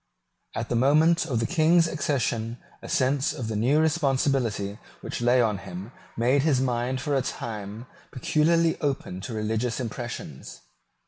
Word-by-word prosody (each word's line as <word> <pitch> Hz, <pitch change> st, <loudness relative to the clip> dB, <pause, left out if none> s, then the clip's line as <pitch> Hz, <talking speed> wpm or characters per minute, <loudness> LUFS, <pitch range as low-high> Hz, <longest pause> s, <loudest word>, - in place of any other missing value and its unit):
At -, -, -3 dB
the -, -, 0 dB
moment 155 Hz, +7 st, +4 dB
of 125 Hz, -7 st, 0 dB
the 115 Hz, -, 0 dB
King's 165 Hz, +1 st, +4 dB
accession 125 Hz, -7 st, -1 dB, 0.2 s
a -, -, -9 dB
sense 135 Hz, +1 st, +1 dB
of 115 Hz, -4 st, -5 dB
the 110 Hz, -, -2 dB
new 125 Hz, +8 st, +3 dB
responsibility 135 Hz, -, +1 dB, 0.2 s
which -, -, -5 dB
lay 120 Hz, +1 st, +4 dB
on 105 Hz, -4 st, 0 dB
him 95 Hz, +3 st, -8 dB, 0.3 s
made 125 Hz, +5 st, +3 dB
his 145 Hz, -3 st, +2 dB
mind 125 Hz, 0 st, 0 dB
for 145 Hz, +1 st, -2 dB
a 135 Hz, -, +2 dB
time 110 Hz, -2 st, -5 dB, 0.2 s
peculiarly 165 Hz, +6 st, +2 dB
open 135 Hz, -, -2 dB
to 115 Hz, -, -6 dB
religious 110 Hz, +3 st, -1 dB
impressions. 120 Hz, -, -6 dB
125 Hz, 150 wpm, -26 LUFS, 115-145 Hz, 0.3 s, moment